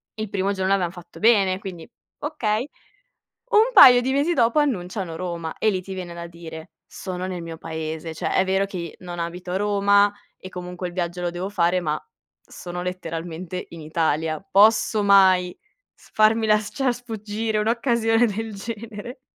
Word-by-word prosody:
il 215 -1 -4
primo 195 0 0
giorno 190 -1 -1
l'avevam 185 -3 +2
fatto 175 -1 -13
bene, 200 -4 +4
quindi 185 -5 -8 0.3
okay. 250 -6 -1 0.8
Un 445 +2 +5
paio 250 - +9
di 260 +2 0
mesi 290 +5 +1
dopo 235 0 +3
annunciano 185 - -2
Roma, 170 -2 -4
e 220 - +2
lì 190 -2 -2
ti 190 +1 -7
viene 180 -2 -6
da 170 0 -7
dire: 165 0 -10 0.2
"Sono 185 -1 -5
nel 180 -2 -5
mio 165 -1 -7
paese. 160 0 -5
Cioè - - -3
è 190 - +4
vero 190 +1 +1
che 175 -5 -6
non 175 -1 -7
abito 175 +2 -5
a - - 0
Roma 200 0 +3 0.3
e, 185 - -9
comunque, 180 0 -6
il 175 - -11
viaggio 175 0 -3
lo 175 - -1
devo 175 +2 -4
fare, 180 -2 +2
ma 155 -3 -1 0.4
sono 180 0 -7
letteralmente 175 0 -5
in 165 - -10
Italia. 155 0 -1
Posso 215 +1 +4
mai 190 -3 +4 0.4
farmi 220 +1 +2
las 215 -1 +2
ciar 270 -4 0
sfuggire 220 -2 -3
un'occasione 230 +1 +2
del 220 0 -4
genere". 225 +3 -7
190 Hz, 165 wpm, -23 LUFS, 175-220 Hz, 0.8 s, paio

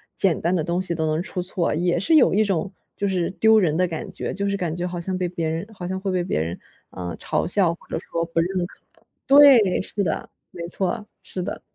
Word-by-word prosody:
简 190 -5 +2
单 175 +3 +1
的 165 - 0
东 170 +3 -1
西 180 -2 +1
都 160 -1 -1
能 155 +1 0
出 180 - -4
错？ 180 -3 0
也 175 +1 +1
是 320 - +3
有 310 - +5
一 210 +3 +4
种 190 -2 -1 0.2
就 200 - -1
是 180 -3 0
丢 220 0 +6
人 160 -6 +1
的 180 +1 +2
感 165 -2 -6
觉， - - -4
就 200 +1 -1
是 200 - -1
感 170 -4 -2
觉 175 +1 -2
好 175 -1 -5
像 185 +2 -2
被 180 -1 -1
别 170 -2 -3
人 165 +5 -3
好 185 -5 -7
像 190 +1 -3
会 195 -1 -2
被 180 -1 0
别 175 - -1
人， 85 +2 -4 0.3
呃， 90 -2 -6
嘲 - - -1
笑 175 -1 +2
或 - - -23
者 - - -2
说 165 0 -3
不 165 0 -2
认 180 +1 0
可 180 - -14 0.5
对， 270 -9 +7
是 205 - -2
的， 160 - -2 0.2
没 170 - -7
错， 190 +3 -2 0.2
是 185 - -5
的。 - - -5
180 Hz, 265 characters per minute, -23 LUFS, 170-195 Hz, 0.5 s, 对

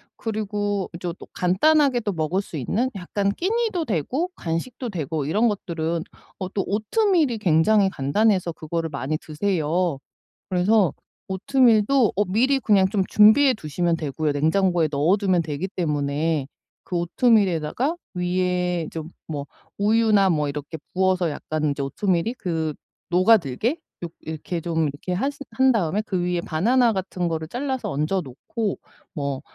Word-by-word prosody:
그리고 205 -2 -2
이제 175 0 -4
또 - - -13
간단하게도 240 - +2
먹을 165 +3 0
수 185 - -11
있는 225 - 0
약간 195 +2 -1
끼니도 420 - 0
되고 250 - -1
간식도 215 +9 -4
되고 155 -5 -3
이런 210 +11 +2
것들은 165 -5 -2 0.4
어 185 - -3
또 195 - 0
오트밀이 295 - +1
굉장히 195 +3 +4
간단해서 185 +4 +1
그거를 165 +1 -3
많이 145 +1 -2
드세요. 165 -1 -1 0.5
그래서 185 -1 +3 0.4
오트밀도 230 +3 +3
어 205 - +3
미리 250 +9 +2
그냥 200 -6 +3
좀 200 -2 +1
준비해 240 +6 +6
두시면 170 - -1
되고요. 150 -1 -2
냉장고에 165 +2 +2
넣어두면 180 +5 +2
되기 160 +4 -4
때문에 150 -3 -1 0.4
그 180 - -2
오트밀에다가 195 - +2 0.2
위에 180 -1 0
좀 160 -1 -6 0.2
뭐 145 -3 -5 0.3
우유나 210 -2 +4
뭐 150 -3 +1
이렇게 150 +2 -6 0.2
부어서 185 -2 +2
약간 155 0 -2
이제 140 - -3
오트밀이 175 - 0
그 160 -6 -2 0.4
녹아들게 190 - +3 0.2
요 - - -2
이렇게 160 +2 -5
좀 160 -2 0
이렇게 145 +6 -5
하신 275 +10 -2
한 260 +3 +4
다음에 205 -3 +1
그 195 -4 -2
위에 175 0 0
바나나 230 +10 +2
같은 185 -2 -2
거를 160 -1 -3
잘라서 260 - -3
얹어 155 +7 0
놓고 185 - -4 0.4
뭐 140 -3 -3
180 Hz, 315 characters per minute, -23 LUFS, 160-215 Hz, 0.5 s, 준비해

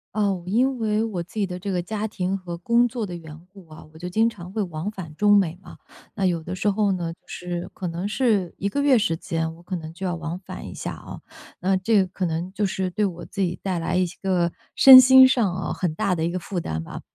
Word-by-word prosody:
嗯， 200 -4 0
因 250 +5 +1
为 215 0 +1
我 205 -6 -3
自 170 - -12
己 210 -2 +1
的 180 -1 -6
这 200 +1 -4
个 180 -2 -1
家 215 +3 -3
庭 190 -2 -2
和 180 -3 -6
工 235 +7 +3
作 235 -2 -4
的 180 -3 -6
缘 160 -2 -10
故 195 -4 -15
啊， 155 - -12
我 - - -14
就 180 +1 -5
经 220 +5 +2
常 185 -6 -7
会 215 +2 -2
往 170 +1 -4
返 180 -7 -9
中 205 +3 +5
美 175 -4 +1
嘛。 - - -13 0.4
那 195 - 0
有 175 -3 +1
的 180 +3 -5
时 190 - -2
候 205 0 +1
呢， 175 -3 -2
就 - - -25
是 175 -1 -5
可 185 - -4
能 170 +3 -3
是 210 -6 0
1 200 - -2
个 285 - -1
月 280 -3 +5
时 185 -7 +1
间， 160 0 -3
我 170 - -17
可 185 +2 -5
能 160 -2 -7
就 190 +3 -4
要 175 - -1
往 170 +1 -5
返 185 - -9
一 - - -8
下 - - -5
啊。 - - -10 0.4
呃， 190 +1 +1
这 215 +5 +1
个 - - -6
可 185 +1 -3
能 170 +2 -3
就 205 +1 0
是 190 -1 -2
对 210 +4 0
我 175 -3 -5
自 200 - -10
己 175 -2 -1
带 190 -2 -2
来 170 +2 -2
一 185 - +3
些 175 - -11
个， 180 -3 +1 0.2
身 265 -1 +11
心 260 0 +8
上 235 -8 +1
哦， - - -3
很 175 -4 -2
大 180 +3 0
的 160 - -2
一 170 - -1
个 185 - -3
负 180 +1 -4
担 80 - -4
吧。 - - -8
185 Hz, 285 characters per minute, -23 LUFS, 170-210 Hz, 0.4 s, 身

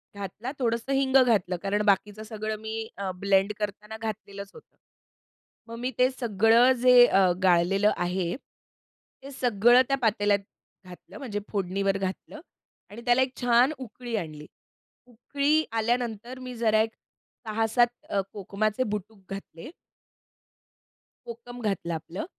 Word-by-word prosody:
घातला, 200 +5 -6
थोडंसं 235 +1 -1
हिंग 270 -1 +1
घातलं 200 -7 +1
कारण 200 +1 0
बाकीचं 205 +2 +1
सगळं 215 0 -4
मी 220 0 -5
अ, 195 -1 -3
ब्लेंड 195 +2 +2
कराना 210 +1 -5
घातलेलंच 200 -3 -6
होतं. - - -17 0.9
मग 230 - -7
मी 250 +2 -2
ते 255 +1 +4
सगळं 230 0 +4
जे 250 -1 +8
अ, 190 -5 +4
गाळलेलं 190 +3 +3
आहे, 175 0 -1
ते 275 0 -20
सगळं 245 -1 +4
त्या 275 - +2
पातेल्यात 205 -2 +2 0.4
घातलं, 180 -1 -13
म्हणजे 215 -7 -4
फोडणीवर 195 0 0
घातलं 195 +10 -5 0.5
आणि 230 +3 -10
त्याला 245 +1 +4
एक 260 0 -3
छान 245 +3 +4
उकळी 240 -1 -6
आणली. 155 -6 -6 0.6
उकळी 280 +6 0
आल्यानंतर, 235 +1 -2
मी 255 -1 -7
जरा 220 -2 +2
एक 225 0 -4 0.5
6-7 225 +2 +2 0.2
अ, 200 - 0
कोकमाचे 210 +3 -2
बुटुक 210 +1 -7
घातले. 195 - -8 1.6
कोकम 240 +1 -9
घातलं 195 -5 -2
आपलं. 165 - -5
220 Hz, 130 wpm, -26 LUFS, 195-245 Hz, 1.6 s, जे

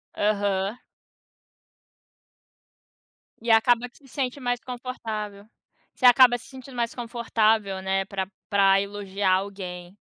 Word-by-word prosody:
Aham. 205 +1 0 2.6
E 230 -1 0
acaba 240 +2 +4
que - - -24
se 275 - -20
sente 265 0 -3
mais 245 -1 -1
confortável. 220 -5 -6 0.5
Você 255 - -2
acaba 245 0 +7
se - - -15
sentindo 265 -1 -12
mais 235 -1 -1
confortável, 225 -4 0
né, 195 0 0
pra 190 -1 -3 0.2
pra 195 -1 +4
elogiar 200 -1 -2
alguém. 185 -2 -4
215 Hz, 115 wpm, -25 LUFS, 195-245 Hz, 2.6 s, acaba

